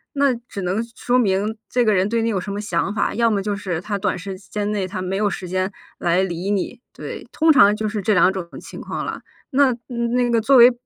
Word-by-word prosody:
那 280 Hz, -3 st, +3 dB
只 200 Hz, -, -6 dB
能 185 Hz, +4 st, -1 dB, 0.2 s
说 245 Hz, +1 st, +1 dB
明 210 Hz, 0 st, +1 dB
这 245 Hz, -1 st, +2 dB
个 215 Hz, -, +3 dB
人 190 Hz, 0 st, +3 dB
对 230 Hz, +1 st, 0 dB
你 230 Hz, -, +1 dB
有 200 Hz, -, 0 dB
什 200 Hz, +2 st, -5 dB
么 205 Hz, -, -3 dB
想 190 Hz, 0 st, -1 dB
法， 210 Hz, -, 0 dB
要 230 Hz, 0 st, +3 dB
么 200 Hz, -2 st, +1 dB
就 205 Hz, 0 st, -2 dB
是 185 Hz, -5 st, -3 dB
他 205 Hz, 0 st, -3 dB
短 -, -, 0 dB
时 190 Hz, 0 st, -6 dB
间 205 Hz, +1 st, -4 dB
内 195 Hz, -3 st, -1 dB
他 185 Hz, 0 st, -5 dB
没 185 Hz, +1 st, -2 dB
有 210 Hz, -, +2 dB
时 185 Hz, -3 st, -4 dB
间 185 Hz, +1 st, -1 dB, 0.3 s
来 175 Hz, +2 st, +2 dB
理 180 Hz, +1 st, -2 dB
你。 205 Hz, +5 st, -2 dB
对， -, -, -8 dB
通 320 Hz, 0 st, +4 dB
常 205 Hz, -8 st, +6 dB
就 215 Hz, 0 st, -2 dB
是 210 Hz, 0 st, -3 dB
这 215 Hz, -, +3 dB
两 180 Hz, 0 st, +5 dB
种 185 Hz, -3 st, -5 dB
情 -, -, -10 dB
况 -, -, -4 dB
了。 -, -, -5 dB, 0.3 s
那 270 Hz, -2 st, +3 dB
那 240 Hz, 0 st, 0 dB
个 230 Hz, -, +3 dB
作 260 Hz, +4 st, +4 dB
为， 245 Hz, +1 st, +9 dB
205 Hz, 265 characters per minute, -21 LUFS, 190-235 Hz, 0.3 s, 为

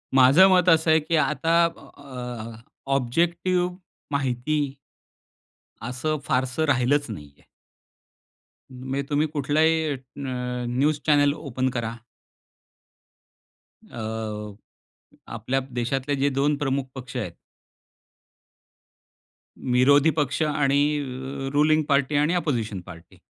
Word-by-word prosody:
माझं 135 Hz, +8 st, +7 dB
मत 180 Hz, -1 st, +4 dB
असं 160 Hz, -1 st, +4 dB
आहे 160 Hz, -, +5 dB
की 160 Hz, +2 st, -1 dB
आता 160 Hz, +3 st, +1 dB
अ, 125 Hz, -5 st, -8 dB
ऑब्जेक्टिव्ह, 175 Hz, +7 st, 0 dB, 0.4 s
माहिती 140 Hz, +1 st, -1 dB, 1.1 s
असं 130 Hz, +6 st, -2 dB
फारसं 130 Hz, +4 st, 0 dB
राहिलंच 145 Hz, +1 st, +2 dB
नाहीये. 75 Hz, -9 st, -10 dB, 1.3 s
म्हणजे 130 Hz, +2 st, -4 dB
तुम्ही 150 Hz, +2 st, +1 dB
कुठलाही 155 Hz, +3 st, +2 dB
अ, -, -, 0 dB
अ, 125 Hz, -2 st, -5 dB
न्यूज 145 Hz, +2 st, +2 dB
चॅनेल 145 Hz, -2 st, +4 dB
ओपन 130 Hz, -3 st, -2 dB
करा. 115 Hz, -2 st, -3 dB, 2.0 s
अ, 110 Hz, -2 st, -5 dB, 0.8 s
आपल्या 135 Hz, +1 st, -1 dB
देशातले 130 Hz, +3 st, -1 dB
जे 140 Hz, +1 st, +1 dB
दोन 140 Hz, +2 st, +1 dB
प्रमुख 135 Hz, -2 st, -1 dB
पक्ष 130 Hz, 0 st, -7 dB
आहेत. 105 Hz, -8 st, -4 dB, 2.3 s
विरोधी 135 Hz, +4 st, +4 dB
पक्ष 145 Hz, +2 st, -1 dB
आणि 145 Hz, -2 st, +1 dB, 0.2 s
अ, 135 Hz, 0 st, -5 dB
रुलिंग 155 Hz, +2 st, +3 dB
पार्टी 140 Hz, 0 st, +2 dB
आणि 150 Hz, +4 st, +2 dB
अपोजिशन 120 Hz, -, -1 dB
पार्टी, 85 Hz, -2 st, -14 dB
135 Hz, 100 wpm, -24 LUFS, 125-150 Hz, 2.3 s, माझं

